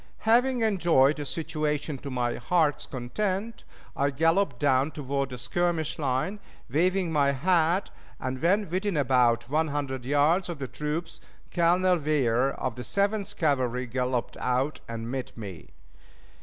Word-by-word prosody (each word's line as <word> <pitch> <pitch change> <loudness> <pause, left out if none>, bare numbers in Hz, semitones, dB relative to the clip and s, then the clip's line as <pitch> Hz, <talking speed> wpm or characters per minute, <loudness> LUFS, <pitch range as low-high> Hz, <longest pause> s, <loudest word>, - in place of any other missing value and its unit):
Having 245 +2 +3
enjoyed 170 -9 +3
the 145 -1 -4
situation 150 -3 -2
to 140 - -7
my 125 -2 -1
heart's 150 +3 +1
content, 195 - -3 0.3
I 140 +1 +1
galloped 165 +1 +2
down 135 +1 +2
toward 140 -3 -3
the 125 - -7
skirmish 165 +2 -1
line, 145 +9 -1 0.3
waving 180 +4 +1
my 140 -3 +3
hat, 170 +5 +2 0.3
and 130 0 -4
when 200 +5 +2
within 190 -1 -1
about 125 -4 +3
one 155 +4 +1
hundred 140 -3 -3
yards 145 +8 +2
of 170 - -4
the 135 -2 -4
troops, 150 +5 -4 0.3
Colonel 180 +1 +3
Weir, 135 -4 +2
of 125 -3 -4
the 125 - -5
Seventh 200 - -1
Cavalry, 130 -5 +1
galloped 125 0 -2
out 130 +4 0
and 115 0 -5
met 130 -2 -5
me. 100 -6 -8
150 Hz, 140 wpm, -27 LUFS, 130-175 Hz, 0.3 s, Having